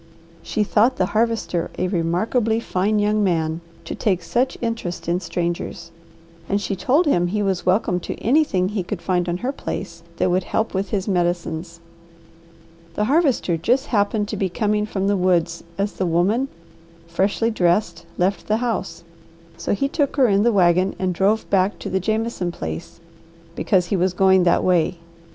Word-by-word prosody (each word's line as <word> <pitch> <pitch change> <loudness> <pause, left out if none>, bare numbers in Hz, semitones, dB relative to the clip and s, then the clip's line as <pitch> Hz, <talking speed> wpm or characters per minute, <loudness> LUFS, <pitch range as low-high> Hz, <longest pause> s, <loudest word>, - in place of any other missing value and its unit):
She 215 - -1
thought 220 +5 +3
the 185 - +1
Harvester 220 -6 0
a 185 - 0
remarkably 210 +6 0
fine 210 -1 0
young 210 0 +2
man 165 -3 0 0.2
to - - -5
take 185 -5 0
such 250 +7 0
interest 180 -8 -4
in 175 +1 +1
strangers 170 0 -4 0.6
and 200 - +1
she 200 0 -2
told 280 - +2
him 175 - +2
he 205 +3 -1
was 190 -3 -1
welcome 185 -1 +2
to - - -5
anything 230 -9 +2
he 210 -1 -2
could 180 +1 -5
find 175 -1 0
on 175 - -1
her 265 - +1
place 170 -10 -6 0.2
that 180 - +1
would 180 0 +1
help 220 - -1
with 190 0 -2
his 195 -2 -2
medicines. 175 -2 -2 1.1
The 210 - 0
Harvester 265 - +2
just 245 - +1
happened 205 0 +1
to 215 - -3
be 190 -1 0
coming 210 +2 0
from 195 -2 -2
the 200 +1 +2
woods 175 -3 +1
as 200 +1 -1
the 185 - -2
woman 195 +10 +2 0.6
freshly 195 +7 0
dressed 175 -3 +1
left 190 +2 0
the 215 - +2
house, 205 -8 -3 0.5
so 170 +4 -1
he 275 - 0
took 285 -1 -1
her 270 -3 +4
in 200 -2 +3
the 235 +2 +4
wagon 185 -1 +3
and 185 -1 -1
drove 200 +5 +1
back 195 0 +2
to - - -6
the 190 - +1
Jameson 215 -2 -1
place, 80 - -6 0.6
because 185 -4 +2
he 185 - -1
was 185 0 +1
going 190 -1 +4
that 175 - +3
way. 175 -1 +2
190 Hz, 175 wpm, -22 LUFS, 175-215 Hz, 1.1 s, her